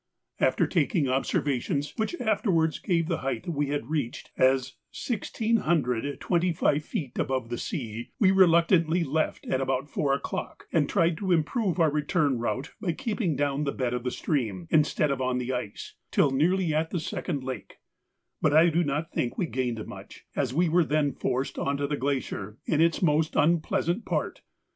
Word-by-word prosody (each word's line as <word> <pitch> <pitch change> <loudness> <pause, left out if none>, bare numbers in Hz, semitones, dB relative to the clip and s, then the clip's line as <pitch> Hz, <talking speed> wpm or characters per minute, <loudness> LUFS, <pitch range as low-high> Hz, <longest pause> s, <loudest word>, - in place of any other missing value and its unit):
After - - +3
taking 165 - +1
observations, 135 +2 0
which 225 +11 -2
afterwards 195 -8 +1
gave 165 -4 0
the 165 -2 -1
height 135 +7 -3
we 145 -4 -1
had 145 -2 -3
reached 145 -7 -3
as 130 0 +2 0.2
1,625 170 - 0
feet 140 -4 -5
above 130 -3 -1
the 120 - -3
sea, 120 - -5
we 190 -4 +5
reluctantly 170 -2 +4
left 155 +1 -1
at 130 - 0
about 135 +2 -1
four 140 -2 0
o'clock, - - -5
and 155 -4 +2
tried 170 -4 +2
to 190 -2 -1
improve 180 - +1
our 160 -3 +4
return 150 -3 +1
route 130 +4 -3
by 180 -6 0
keeping 210 - -1
down 145 +1 0
the 140 - 0
bed 125 -3 -2
of 125 -1 -2
the 125 - 0
stream, 110 - -2
instead 150 -1 +3
of 135 -1 -2
on 130 -1 0
the 125 +1 -2
ice, 125 -5 -5 0.2
till 140 - +3
nearly 165 +4 +2
at 160 +1 0
the 175 - -2
second 155 -3 -3
lake; 130 -1 -6 0.7
but 150 - +3
I 165 +2 +7
do 170 +2 +2
not 150 +2 -2
think 120 - -2
we 185 - +1
gained 125 -7 -2
much, - - -11
as 130 -4 0
we 170 +6 +2
were 170 +2 +4
then 150 -2 +1
forced 130 +1 -2
on 140 0 0
to 140 - -1
the 145 +1 -1
glacier 130 -7 -3
in 155 -1 +2
its 165 +2 +2
most 155 -1 +2
unpleasant 170 +5 +1
part. - - -2
150 Hz, 175 wpm, -27 LUFS, 130-170 Hz, 0.7 s, I